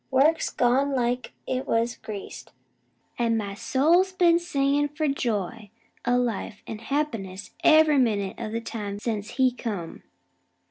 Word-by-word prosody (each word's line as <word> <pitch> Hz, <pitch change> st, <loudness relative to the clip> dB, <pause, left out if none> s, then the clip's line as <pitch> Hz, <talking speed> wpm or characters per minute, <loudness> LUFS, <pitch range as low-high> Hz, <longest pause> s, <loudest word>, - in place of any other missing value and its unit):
Work's 285 Hz, +5 st, +3 dB
gone 270 Hz, +3 st, +2 dB
like 245 Hz, -1 st, -1 dB
it 260 Hz, 0 st, -2 dB
was 230 Hz, +1 st, +1 dB
greased, 205 Hz, -2 st, -8 dB, 0.7 s
an' 230 Hz, -1 st, +2 dB
my 200 Hz, -2 st, -3 dB
soul's 310 Hz, -, +2 dB
been 345 Hz, -2 st, +4 dB
singin' 290 Hz, -4 st, +1 dB
for 300 Hz, +1 st, -2 dB
joy 225 Hz, -6 st, -2 dB, 0.4 s
o' 245 Hz, 0 st, +4 dB
life 230 Hz, -3 st, -2 dB
an' 215 Hz, -, -6 dB
happiness 225 Hz, -8 st, -3 dB
ev'ry 310 Hz, -2 st, +6 dB
minute 205 Hz, -6 st, 0 dB
o' 225 Hz, -2 st, -4 dB
the 230 Hz, +1 st, -3 dB
time 210 Hz, -3 st, -5 dB
since 210 Hz, -1 st, -3 dB
he 260 Hz, -1 st, +4 dB
come. 205 Hz, -9 st, -5 dB
245 Hz, 140 wpm, -26 LUFS, 215-280 Hz, 0.7 s, ev'ry